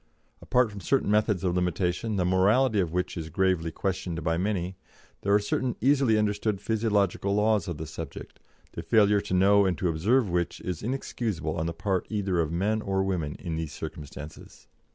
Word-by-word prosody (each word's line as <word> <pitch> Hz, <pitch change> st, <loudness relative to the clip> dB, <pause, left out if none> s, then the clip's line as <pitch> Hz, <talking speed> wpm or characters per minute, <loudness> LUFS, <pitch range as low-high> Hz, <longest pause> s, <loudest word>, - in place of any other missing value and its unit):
Apart 125 Hz, -3 st, +2 dB
from 100 Hz, -, -8 dB
certain 135 Hz, -4 st, +1 dB
methods 105 Hz, -3 st, +2 dB
of 90 Hz, -2 st, +1 dB
limitation, 90 Hz, +4 st, 0 dB
the 90 Hz, -2 st, +1 dB
morality 105 Hz, +6 st, +3 dB
of 90 Hz, -4 st, 0 dB
which 90 Hz, +1 st, -2 dB
is 80 Hz, -2 st, -5 dB
gravely 90 Hz, -1 st, +1 dB
questioned 85 Hz, -1 st, -3 dB
by 80 Hz, 0 st, +1 dB
many, 95 Hz, 0 st, -1 dB, 0.5 s
there 100 Hz, -, 0 dB
are 100 Hz, -, +7 dB
certain 120 Hz, +4 st, -1 dB
easily 135 Hz, -4 st, +3 dB
understood 105 Hz, -1 st, 0 dB
physiological 100 Hz, -3 st, 0 dB
laws 105 Hz, -2 st, +2 dB
of 85 Hz, -4 st, -4 dB
the 80 Hz, -, -5 dB
subject, 80 Hz, +1 st, -8 dB, 0.3 s
the -, -, -6 dB
failure 100 Hz, +4 st, +4 dB
to 100 Hz, -2 st, -2 dB
know 100 Hz, +2 st, +5 dB
and 90 Hz, -, 0 dB
to 90 Hz, -, 0 dB
observe 105 Hz, +10 st, +2 dB
which 85 Hz, -3 st, -1 dB
is 90 Hz, -4 st, -4 dB
inexcusable 110 Hz, -, -3 dB
on 80 Hz, 0 st, -1 dB
the -, -, -1 dB
part 95 Hz, +1 st, -1 dB
either 100 Hz, -5 st, -1 dB
of 80 Hz, -2 st, 0 dB
men 105 Hz, +6 st, 0 dB
or 95 Hz, -2 st, 0 dB
women 85 Hz, -6 st, -2 dB
in 85 Hz, -3 st, -4 dB
these 80 Hz, -2 st, -4 dB
circumstances. 75 Hz, -1 st, -9 dB
95 Hz, 185 wpm, -27 LUFS, 85-105 Hz, 0.5 s, are